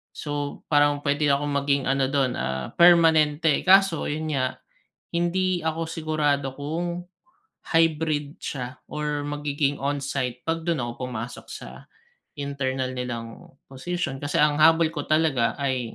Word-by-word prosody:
So, 145 -1 -4
parang 145 -1 +3
pwede 145 +1 +1
akong 145 +1 +1
maging 140 -1 +1
ano 135 -1 +2
do'n, 135 -2 0
ah, 65 0 -3
permanente. 160 -3 +5
Kaso 195 -3 +5
yun 155 +1 -3
nga, 130 -3 0 0.6
hindi 175 0 0
ako 160 0 -2
sigurado 150 -4 -1
kung, 170 +4 -3 0.6
hybrid 155 -3 +1
siya 125 -1 -5
or 150 -1 -3
magiging 145 -1 -1
on-site, 135 -3 -2
'pag 165 0 -1
dun 165 -1 0
ako 125 +2 -5
pumasok 120 0 -7
sa - - -10 0.5
internal 135 -3 -2
nilang 120 -2 -6 0.2
posisyon, 135 0 -3
kasi 145 +1 -5
ang 150 0 +3
habol 160 +1 +5
ko 150 -3 -5
talaga 150 -7 +2
ay, 130 -4 -2
145 Hz, 130 wpm, -25 LUFS, 135-160 Hz, 0.6 s, permanente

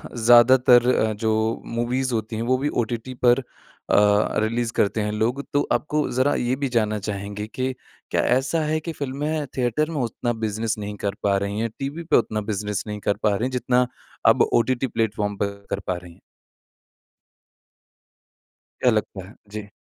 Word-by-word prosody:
ज़्यादातर 120 +1 +6
अ, 110 0 +1
जो 110 +1 0
मूवीज़ 125 +2 -1
होती 110 0 -2
हैं 115 - -2
वो 130 +2 +2
भी 145 +3 -1
ओटीटी 120 +3 -5
पर 120 +2 +6
अ, - - -7 1.0
रिलीज़ 115 +1 0
करते 105 +1 +1
हैं 105 0 -1
लोग। 120 +6 -1
तो 145 - +3
आपको 150 0 0
ज़रा 130 +3 +2
ये 125 +1 0
भी 140 -1 -2
जानना 110 -3 0
चाहेंगे 100 +1 -5
कि 130 +3 -3 0.4
क्या - - +2 0.2
ऐसा 140 +5 0
है 155 +1 0
कि 165 +1 -5
फिल्में 145 +2 -3
थिएटर 130 +6 +1
में 145 -5 -2
उतना 120 +1 -2
बिज़नेस 110 +1 -1
नहीं 105 0 -5
कर 100 0 -1
पा 100 -1 +3
रही 100 +2 -2
हैं? 115 0 -1
टीवी 145 +5 -4
पे 165 - +3
उतना 110 -2 0
बिज़नेस 105 0 -2
नहीं 105 0 -4
कर 100 -1 0
पा 105 -2 +3
रही 115 +5 -1
हैं? 130 - -2
जितना 125 0 +1 0.4
अब - - +5
ओटीटी 130 +2 +2
प्लेटफ़ॉर्म 105 -3 -1
पर 100 0 -3
कर 100 - -2
पा 90 - +1
रहे 90 -1 -11
हैं? - - -19 2.6
क्या 125 - +5
लगता 105 -3 -2
है? 105 - -15 0.2
जी। 105 -1 -6
115 Hz, 180 wpm, -23 LUFS, 105-130 Hz, 2.6 s, ज़्यादातर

